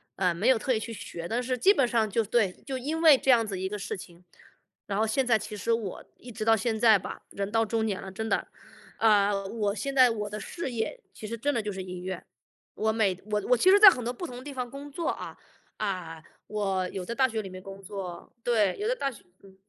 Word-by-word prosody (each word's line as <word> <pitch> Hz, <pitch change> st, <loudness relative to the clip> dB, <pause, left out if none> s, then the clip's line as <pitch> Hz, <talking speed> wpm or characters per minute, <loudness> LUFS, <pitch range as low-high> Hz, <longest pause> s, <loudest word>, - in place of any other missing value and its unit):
呃， 180 Hz, -2 st, +1 dB
没 185 Hz, +8 st, -1 dB
有 260 Hz, -3 st, +6 dB
特 255 Hz, -, 0 dB
意 220 Hz, -, 0 dB
去 230 Hz, -, -6 dB
学， 170 Hz, -6 st, -7 dB
但 235 Hz, +5 st, -1 dB
是 250 Hz, 0 st, -2 dB
基 390 Hz, -, +5 dB
本 270 Hz, -10 st, +2 dB
上 225 Hz, -2 st, +1 dB
就 225 Hz, +3 st, +1 dB
对， 215 Hz, -2 st, +2 dB
就 265 Hz, -1 st, -3 dB
因 305 Hz, +6 st, -3 dB
为 310 Hz, -5 st, +8 dB
这 265 Hz, -, +3 dB
样 230 Hz, -2 st, +5 dB
子 200 Hz, -3 st, -4 dB
一 190 Hz, 0 st, -2 dB
个 210 Hz, -, -4 dB
事 -, -, -4 dB
情， 180 Hz, -2 st, -12 dB, 0.6 s
然 200 Hz, -, -2 dB
后 220 Hz, -, +3 dB
现 260 Hz, +5 st, +1 dB
在 235 Hz, -2 st, +4 dB
其 215 Hz, -, -7 dB
实 220 Hz, +3 st, -2 dB
我 225 Hz, -5 st, -2 dB
一 245 Hz, -, -11 dB
直 215 Hz, 0 st, -5 dB
到 225 Hz, 0 st, +4 dB
现 225 Hz, +1 st, -1 dB
在 220 Hz, -2 st, +7 dB
吧， -, -, -7 dB
人 200 Hz, 0 st, -4 dB
到 225 Hz, 0 st, +3 dB
中 225 Hz, 0 st, 0 dB
年 200 Hz, -3 st, -2 dB
了， 190 Hz, -, -8 dB
真 220 Hz, +4 st, -4 dB
的， -, -, 0 dB, 0.5 s
呃， 205 Hz, -2 st, +3 dB
我 205 Hz, -1 st, -1 dB
现 275 Hz, +6 st, -3 dB
在 255 Hz, -2 st, +7 dB
我 210 Hz, -2 st, -3 dB
的 210 Hz, +1 st, -5 dB
事 335 Hz, 0 st, -5 dB
业， 235 Hz, -, -3 dB
其 -, -, -9 dB
实 230 Hz, +2 st, -4 dB
真 285 Hz, +6 st, 0 dB
的 230 Hz, -, 0 dB
就 210 Hz, -1 st, -4 dB
是 190 Hz, -1 st, -5 dB
音 180 Hz, -1 st, -7 dB
乐。 185 Hz, -1 st, -5 dB, 0.5 s
我 220 Hz, 0 st, +1 dB
每 215 Hz, -4 st, +2 dB
我 210 Hz, 0 st, +1 dB
我 250 Hz, -, +6 dB
其 370 Hz, -, +4 dB
实 395 Hz, -, +8 dB
在 410 Hz, -1 st, +12 dB
很 255 Hz, -10 st, -2 dB
多 240 Hz, -, -1 dB
不 350 Hz, -, -6 dB
同 250 Hz, -7 st, -8 dB
的 250 Hz, -, -9 dB
地 285 Hz, 0 st, -7 dB
方 250 Hz, -2 st, -3 dB
工 280 Hz, +3 st, -9 dB
作 330 Hz, +3 st, -2 dB
啊， -, -, -5 dB, 0.4 s
嗯， 180 Hz, -6 st, -4 dB, 0.2 s
我 195 Hz, -3 st, -1 dB
有 185 Hz, -2 st, -5 dB
在 235 Hz, -, -4 dB
大 260 Hz, +2 st, +3 dB
学 225 Hz, -3 st, -3 dB
里 195 Hz, -, -8 dB
面 185 Hz, 0 st, -9 dB
工 195 Hz, +1 st, -10 dB
作 190 Hz, -2 st, -7 dB
对， 220 Hz, -5 st, +2 dB
有 420 Hz, -, -1 dB
在 -, -, +1 dB
大 275 Hz, -, -1 dB
学 230 Hz, -, -15 dB, 0.2 s
工 195 Hz, -1 st, -17 dB
220 Hz, 285 characters per minute, -28 LUFS, 195-250 Hz, 0.6 s, 在